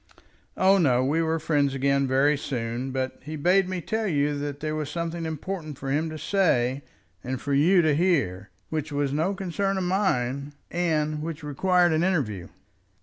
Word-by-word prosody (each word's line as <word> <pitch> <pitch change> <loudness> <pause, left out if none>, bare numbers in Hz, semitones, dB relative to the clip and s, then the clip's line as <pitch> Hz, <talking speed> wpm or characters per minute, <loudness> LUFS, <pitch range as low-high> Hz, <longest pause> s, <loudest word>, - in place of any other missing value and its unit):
"Oh, 195 +1 +5
no; 130 -6 +3
we 155 +5 +1
were 160 0 +1
friends 145 -3 +1
again 140 0 +2
very 135 +3 +3
soon. 125 -2 -3
But 130 0 -3
he 155 +3 -6
bade 180 +5 +3
me 185 -1 -3
tell 220 +4 -2
you 145 -3 +1
that 145 0 -4
there 155 0 -3
was 155 -2 -3
something 170 +1 -3
important 160 -1 -5
for 135 -1 -4
him 155 +3 0
to 155 - -6
say 140 -9 +1 0.4
and 130 0 -3
for 140 - -3
you 170 +6 +5
to 155 -1 +3
hear, 135 - +1 0.2
which 155 -1 -3
was 145 -1 -1
no 165 +7 0
concern 195 +1 -1
of 190 - -1
mine, 140 -8 0 0.2
and 155 -3 0
which 160 -1 -5
required 175 +4 +2
an 160 +2 +2
interview." 120 - -1
155 Hz, 180 wpm, -26 LUFS, 140-175 Hz, 0.4 s, Oh